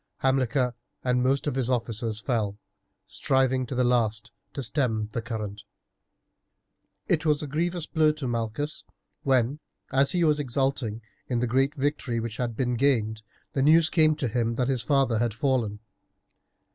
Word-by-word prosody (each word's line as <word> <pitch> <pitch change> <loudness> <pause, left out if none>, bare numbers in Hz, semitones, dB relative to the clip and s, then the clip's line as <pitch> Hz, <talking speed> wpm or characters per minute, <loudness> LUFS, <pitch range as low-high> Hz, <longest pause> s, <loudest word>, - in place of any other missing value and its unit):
Hamilcar 130 -1 +1 0.3
and 125 -1 +2
most 135 +2 +1
of 145 - 0
his 130 -2 -1
officers 115 -3 -1
fell, 110 -4 -1 0.5
striving 130 -1 +1
to 130 - -4
the 125 - +2
last 115 -3 +1 0.2
to 140 - -4
stem 110 -3 0
the 115 - -2
current. 110 -3 -5 1.5
It 160 -2 +1
was 155 -1 +2
a - - -4
grievous 170 +3 -1
blow 155 -1 +3
to 150 -4 -5
Malchus, 120 +5 -2 0.4
when, 130 +1 +1 0.3
as 135 +1 +4
he 175 -1 +2
was 150 -2 +3
exulting 130 -4 -1 0.2
in 125 - -1
the 120 - +1
great 135 +5 +1
victory 135 -4 -1
which 115 -1 -5
had 120 -3 -3
been 125 -2 0
gained, 110 -5 +1 0.3
the 135 - 0
news 155 +3 +5
came 155 -2 +4
to 145 -4 -2
him 115 0 0
that 125 +1 0
his 130 -3 0
father 135 -3 +2
had 115 -2 0
fallen. 120 -6 0
125 Hz, 160 wpm, -26 LUFS, 115-140 Hz, 1.5 s, news